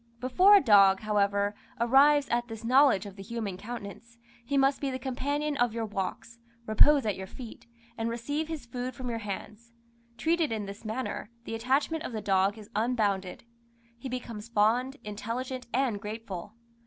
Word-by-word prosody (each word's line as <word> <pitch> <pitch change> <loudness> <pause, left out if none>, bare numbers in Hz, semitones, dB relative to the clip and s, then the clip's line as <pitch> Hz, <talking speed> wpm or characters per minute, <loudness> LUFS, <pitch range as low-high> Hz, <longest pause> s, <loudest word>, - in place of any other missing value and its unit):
Before 360 +12 +6
a 400 - +6
dog, 195 -5 +6
however, 205 -1 +1 0.3
arrives 275 +4 +5
at 240 0 0
this 225 -1 -8
knowledge 255 -4 +4
of 200 0 -10
the - - -8
human 220 -2 -4
countenance, 230 +2 -9 0.3
he 280 +4 -1
must 270 0 +3
be 280 - -1
the 260 - -3
companion 285 +3 -2
of 240 -2 +1
your 230 -1 -1
walks, 210 +3 -5 0.3
repose 270 +5 +5
at 210 -3 0
your 190 0 -7
feet, 235 +1 -11 0.3
and 225 +1 -1
receive 285 +7 -3
his 320 -5 -6
food 245 +1 -5
from 250 -1 -4
your 230 - -3
hands: 215 +2 -7 0.4
treated 320 +3 +1
in 215 -2 -2
this 200 0 -9
manner, 220 0 -4
the 225 - -6
attachment 270 +7 0
of - - -5
the 220 - -2
dog 195 +1 +2
is 210 -1 -12
unbounded; 210 -5 0 0.5
he 240 +3 -7
becomes 235 -3 -6
fond, 235 +5 +2
intelligent, 235 +5 -5
and 245 -5 0
grateful. 210 -3 -7
230 Hz, 170 wpm, -29 LUFS, 210-260 Hz, 0.5 s, Before